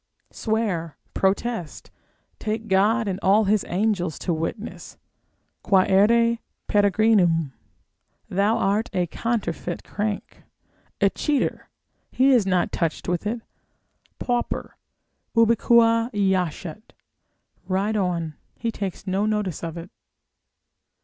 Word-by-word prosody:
Swear, 195 Hz, -, -2 dB, 0.2 s
protest, 195 Hz, -2 st, -1 dB, 0.5 s
take 220 Hz, +1 st, -3 dB
God 210 Hz, +4 st, +3 dB
and 190 Hz, -1 st, -2 dB
all 200 Hz, +3 st, +4 dB
his 205 Hz, 0 st, +2 dB
angels 180 Hz, -3 st, 0 dB
to 175 Hz, -, -2 dB
witness, 165 Hz, +8 st, -5 dB, 0.6 s
quaere 210 Hz, +5 st, +4 dB, 0.3 s
peregrinum, 200 Hz, -7 st, +3 dB, 0.7 s
thou 200 Hz, +4 st, +1 dB
art 205 Hz, +3 st, +1 dB
a 180 Hz, -2 st, +1 dB
counterfeit 180 Hz, -3 st, -3 dB
crank, 210 Hz, 0 st, -4 dB, 0.6 s
a -, -, +4 dB
cheater, 295 Hz, -3 st, -1 dB, 0.4 s
he 265 Hz, +2 st, +4 dB
is 235 Hz, -7 st, +4 dB
not 185 Hz, -2 st, +1 dB
touched 165 Hz, -2 st, -2 dB
with 180 Hz, +3 st, -1 dB
it, 230 Hz, +2 st, -2 dB, 0.8 s
pauper 245 Hz, -1 st, -2 dB, 0.6 s
ubique 230 Hz, 0 st, +4 dB
jacet, 185 Hz, +1 st, -1 dB, 0.7 s
ride 200 Hz, +3 st, 0 dB
on, 175 Hz, -5 st, -1 dB, 0.2 s
he 230 Hz, -, -2 dB
takes 195 Hz, -2 st, -5 dB
no 195 Hz, +2 st, 0 dB
notice 210 Hz, -7 st, -2 dB
of 165 Hz, 0 st, -4 dB
it. 170 Hz, +2 st, -8 dB
200 Hz, 105 wpm, -24 LUFS, 180-225 Hz, 0.8 s, all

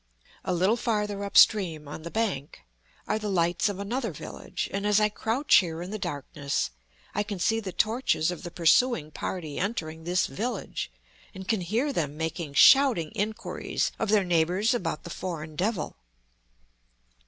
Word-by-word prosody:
A -, -, -2 dB
little 185 Hz, +6 st, +2 dB
farther 210 Hz, -3 st, -1 dB
up 200 Hz, -, -1 dB
stream, 165 Hz, -8 st, +5 dB
on 150 Hz, -, -7 dB
the 170 Hz, -, -6 dB
bank, 190 Hz, -10 st, -2 dB, 0.5 s
are 215 Hz, -, 0 dB
the 210 Hz, -1 st, -3 dB
lights 175 Hz, +2 st, +2 dB
of 200 Hz, -, -4 dB
another 225 Hz, +3 st, -2 dB
village; 150 Hz, -, -5 dB
and 200 Hz, +1 st, -1 dB
as 210 Hz, 0 st, +4 dB
I 210 Hz, 0 st, +3 dB
crouch 230 Hz, +7 st, +3 dB
here 165 Hz, -4 st, +1 dB
in 180 Hz, -, -7 dB
the 215 Hz, -, -4 dB
darkness 145 Hz, -, -3 dB, 0.4 s
I 205 Hz, -, 0 dB
can 205 Hz, -1 st, -4 dB
see 225 Hz, +5 st, +1 dB
the 200 Hz, -4 st, -5 dB
torches 215 Hz, -6 st, +1 dB
of 175 Hz, -, -6 dB
the 175 Hz, -, -6 dB
pursuing 170 Hz, 0 st, +3 dB
party 155 Hz, -3 st, -4 dB
entering 160 Hz, -6 st, -3 dB
this 175 Hz, +2 st, +1 dB
village, 210 Hz, -, -4 dB, 0.5 s
and 190 Hz, 0 st, -8 dB
can 220 Hz, -4 st, +1 dB
hear 230 Hz, -, 0 dB
them 150 Hz, -, -2 dB
making 160 Hz, -2 st, -4 dB
shouting 235 Hz, -, +6 dB
inquiries 215 Hz, +2 st, -2 dB
of 225 Hz, -, -1 dB
their 210 Hz, -1 st, +4 dB
neighbors 175 Hz, +6 st, +2 dB
about 165 Hz, -10 st, -2 dB
the 175 Hz, -, -8 dB
foreign 155 Hz, -4 st, -5 dB
devil. 195 Hz, +1 st, -1 dB
190 Hz, 165 wpm, -27 LUFS, 160-215 Hz, 0.5 s, shouting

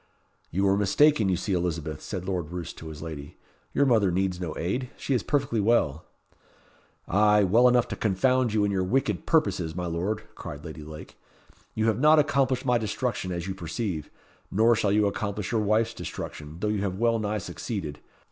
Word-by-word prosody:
"You 95 Hz, +4 st, -1 dB
were 100 Hz, 0 st, +4 dB
mistaken 105 Hz, +2 st, +4 dB
you 90 Hz, -, +2 dB
see, 95 Hz, +2 st, -2 dB
Elizabeth," 80 Hz, -4 st, -2 dB
said 95 Hz, -3 st, -5 dB
Lord 90 Hz, -5 st, -2 dB
Roos 85 Hz, -1 st, -5 dB
to 80 Hz, -, -10 dB
his 80 Hz, 0 st, -8 dB
lady. 75 Hz, -3 st, -8 dB, 0.3 s
"Your 140 Hz, -, +3 dB
mother 110 Hz, -7 st, +4 dB
needs 90 Hz, 0 st, 0 dB
no 80 Hz, -3 st, -4 dB
aid. 120 Hz, +9 st, -2 dB
She 140 Hz, -, -2 dB
is 125 Hz, -, +2 dB
perfectly 135 Hz, -4 st, 0 dB
well." 100 Hz, -9 st, +2 dB, 1.0 s
"Ay, 105 Hz, 0 st, +4 dB
well 115 Hz, +7 st, +5 dB
enough 125 Hz, -1 st, +3 dB
to -, -, -3 dB
confound 125 Hz, +4 st, +2 dB
you 105 Hz, -1 st, +2 dB
and 100 Hz, -, +1 dB
all -, -, 0 dB
your 95 Hz, -, +1 dB
wicked 130 Hz, +9 st, 0 dB
purposes, 95 Hz, -, +1 dB
my 90 Hz, -1 st, -3 dB
Lord," 95 Hz, +6 st, -2 dB
cried 75 Hz, -6 st, -8 dB
Lady 80 Hz, -1 st, -8 dB
Lake. 75 Hz, +1 st, -10 dB, 0.6 s
"You 110 Hz, -, +1 dB
have 110 Hz, 0 st, +2 dB
not 155 Hz, +3 st, +6 dB
accomplished 135 Hz, -3 st, +2 dB
my 125 Hz, -2 st, +3 dB
destruction, 110 Hz, -3 st, -2 dB
as 85 Hz, -1 st, -3 dB
you 95 Hz, -, -3 dB
perceive; 85 Hz, -2 st, -4 dB, 0.4 s
nor 115 Hz, +4 st, +4 dB
shall 105 Hz, -2 st, +1 dB
you 105 Hz, +1 st, +3 dB
accomplish 100 Hz, -2 st, -2 dB
your 115 Hz, -2 st, +1 dB
wife's 110 Hz, +2 st, +2 dB
destruction, 75 Hz, +1 st, -7 dB
though 105 Hz, -, 0 dB
you 105 Hz, -2 st, 0 dB
have 95 Hz, -2 st, -2 dB
well 115 Hz, +1 st, +2 dB
nigh 105 Hz, 0 st, -1 dB
succeeded. 85 Hz, -3 st, -5 dB
100 Hz, 195 wpm, -27 LUFS, 85-115 Hz, 1.0 s, not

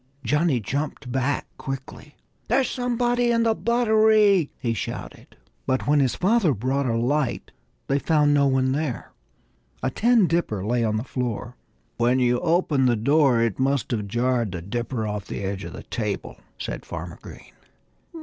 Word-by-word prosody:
Johnnie 150 Hz, +2 st, +2 dB
jumped 140 Hz, +3 st, -4 dB
back 135 Hz, +2 st, 0 dB
quickly. 135 Hz, +2 st, -7 dB, 0.3 s
"There's 255 Hz, +3 st, +2 dB
somebody 245 Hz, -1 st, 0 dB
in 230 Hz, -1 st, +2 dB
the 225 Hz, -1 st, +3 dB
buttery!" 220 Hz, -6 st, +3 dB
he 115 Hz, -2 st, -1 dB
shouted. 110 Hz, -, -7 dB, 0.3 s
But 130 Hz, 0 st, 0 dB
when 145 Hz, 0 st, +3 dB
his 130 Hz, -3 st, +2 dB
father 190 Hz, -, +2 dB
brought 130 Hz, +5 st, -1 dB
a 115 Hz, -1 st, 0 dB
light 130 Hz, +3 st, -1 dB, 0.3 s
they 140 Hz, -, +1 dB
found 150 Hz, -1 st, +3 dB
no 140 Hz, -1 st, +4 dB
one 130 Hz, -1 st, +2 dB
there. 140 Hz, -3 st, -3 dB, 0.7 s
A 130 Hz, -, 0 dB
tin 230 Hz, -, +3 dB
dipper 165 Hz, -, -1 dB
lay 120 Hz, +2 st, +1 dB
on 110 Hz, -1 st, 0 dB
the 110 Hz, -, -2 dB
floor. 125 Hz, -2 st, -4 dB, 0.4 s
"When 120 Hz, +2 st, +2 dB
you 125 Hz, -1 st, +2 dB
opened 160 Hz, -5 st, +2 dB
the 120 Hz, -, +3 dB
door 135 Hz, +1 st, +3 dB
it 115 Hz, -1 st, -1 dB
must 135 Hz, -2 st, 0 dB
have 105 Hz, -4 st, -2 dB
jarred 120 Hz, -1 st, 0 dB
the 85 Hz, -, -5 dB
dipper 120 Hz, +3 st, -3 dB
off 105 Hz, -2 st, -4 dB
the -, -, -5 dB
edge 95 Hz, 0 st, -3 dB
of -, -, -8 dB
the -, -, -9 dB
table," -, -, -4 dB, 0.2 s
said -, -, -5 dB
Farmer -, -, -7 dB
Green. -, -, -13 dB
135 Hz, 165 wpm, -24 LUFS, 120-170 Hz, 0.7 s, no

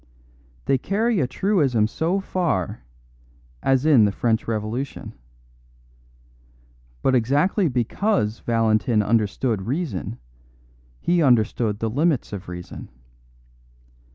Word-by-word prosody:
They 135 Hz, -, +2 dB
carry 215 Hz, -, 0 dB
a 130 Hz, -, +1 dB
truism 135 Hz, -, +1 dB
so 170 Hz, -, -1 dB
far 175 Hz, -, -2 dB, 0.8 s
as 135 Hz, +1 st, +2 dB
in 135 Hz, -9 st, +6 dB
the 100 Hz, -, +1 dB
French 110 Hz, +2 st, 0 dB
Revolution. 115 Hz, +5 st, -4 dB, 1.9 s
But 135 Hz, -, +3 dB
exactly 145 Hz, -, +2 dB
because 125 Hz, -, 0 dB
Valentin 110 Hz, -1 st, +1 dB
understood 110 Hz, 0 st, 0 dB
reason, 130 Hz, -, -3 dB, 0.8 s
he 175 Hz, 0 st, +1 dB
understood 115 Hz, -5 st, +2 dB
the 110 Hz, +1 st, -2 dB
limits 145 Hz, -2 st, 0 dB
of 100 Hz, -2 st, -7 dB
reason. 90 Hz, 0 st, -8 dB
125 Hz, 100 wpm, -23 LUFS, 110-160 Hz, 1.9 s, in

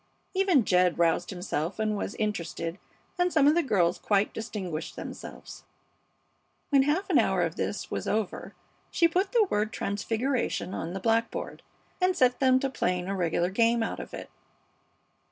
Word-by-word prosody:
Even 375 Hz, -, +3 dB
Jed 180 Hz, -1 st, +3 dB
roused 170 Hz, +1 st, +2 dB
himself 180 Hz, -2 st, -3 dB
and 215 Hz, -1 st, 0 dB
was 200 Hz, -, -4 dB
interested, 175 Hz, -4 st, -3 dB, 0.4 s
and 355 Hz, 0 st, +2 dB
some 305 Hz, -4 st, +4 dB
of 295 Hz, -, +6 dB
the 345 Hz, -, +3 dB
girls 185 Hz, -, +1 dB
quite 205 Hz, 0 st, +1 dB
distinguished 185 Hz, -8 st, -5 dB
themselves. -, -, -9 dB, 1.1 s
When 275 Hz, -1 st, +6 dB
a -, -, +1 dB
half 360 Hz, +7 st, +1 dB
hour -, -, +3 dB
of -, -, -2 dB
this -, -, -3 dB
was -, -, -3 dB
over 215 Hz, -2 st, -2 dB, 0.3 s
she 335 Hz, -, +3 dB
put 370 Hz, +4 st, 0 dB
the 475 Hz, -3 st, +4 dB
word 210 Hz, +1 st, +1 dB
"TRANSFIGURATION" 225 Hz, +1 st, -2 dB
on 165 Hz, +2 st, -4 dB
the 195 Hz, -, -3 dB
blackboard, 225 Hz, +3 st, -1 dB, 0.4 s
and 365 Hz, 0 st, +2 dB
set 250 Hz, -1 st, +3 dB
them 260 Hz, -1 st, +4 dB
to 275 Hz, -, 0 dB
playing 180 Hz, -6 st, -1 dB
a 195 Hz, -, -2 dB
regular 175 Hz, 0 st, 0 dB
game 230 Hz, +3 st, +3 dB
out -, -, -3 dB
of -, -, -8 dB
it. -, -, -8 dB
215 Hz, 165 wpm, -28 LUFS, 180-270 Hz, 1.1 s, of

